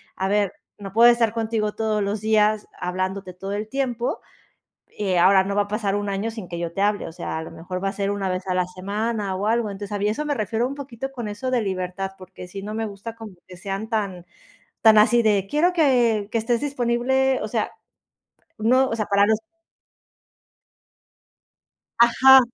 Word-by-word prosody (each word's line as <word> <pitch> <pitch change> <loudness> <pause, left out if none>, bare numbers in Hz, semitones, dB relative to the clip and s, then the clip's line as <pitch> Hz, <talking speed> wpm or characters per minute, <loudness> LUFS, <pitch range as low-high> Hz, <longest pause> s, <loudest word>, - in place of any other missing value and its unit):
a 190 - -1
ver, 205 -1 +1 0.3
no 195 -1 -8
puedo 235 +2 +8
estar 230 -2 +1
contigo 220 -2 -1
todos 220 -1 0
los 200 +1 -2
días 215 -1 +2
hablándote 185 +1 -3
todo 195 +2 -7
el 210 +1 -3
tiempo, 250 -3 -2 0.7
eh, 195 -3 -2
ahora, 190 +2 +6
no 200 +1 -3
va 205 - +3
a - - -11
pasar 205 -1 -1
1 205 0 -2
año 200 +3 -2
sin 220 -5 -8
que 170 -1 -5
yo 170 -1 -3
te 195 - -3
hable, 205 0 +1
o - - -7
sea, 160 - -5
a - - -5
lo - - -9
mejor 180 +3 -6
va 195 - +1
a - - -3
ser 200 -1 -1
1 200 -2 -2
vez 185 +1 -3
a 185 - 0
la 180 -1 +1
semana, 200 +2 -3
o 200 +3 -2
algo, 225 -1 +1
entonces, 200 +1 -7
a - - -2
mí 205 - +1
eso 220 +8 -1
me 295 - 0
refiero 225 +1 -1
un 275 - -6
poquito 270 -2 -6
con 240 -5 -5
eso 245 +5 -4
de 250 -2 +2
libertad, 190 -1 -3
porque 185 -1 -11
sí, 195 +2 -7
no 210 +2 -6
me 225 0 -1
gusta 210 +2 -7
como 225 -3 -10
que 180 - -12
sean 195 +4 -5
tan 200 -6 -2 0.6
tan 220 -1 +7
así 235 +2 +5
de: 205 -3 +2
"Quiero 330 +5 +3
que 240 - +3
que 230 - 0
estés 230 +1 0
disponible", 265 0 +1
o 215 - -3
sea, 220 -1 -1 0.9
no, 255 +5 +3
o 230 - -2
sea, 215 - -1
para 200 0 +4
los 220 0 +3 2.6
Ajá. 265 +3 +8
210 Hz, 210 wpm, -23 LUFS, 195-235 Hz, 2.6 s, puedo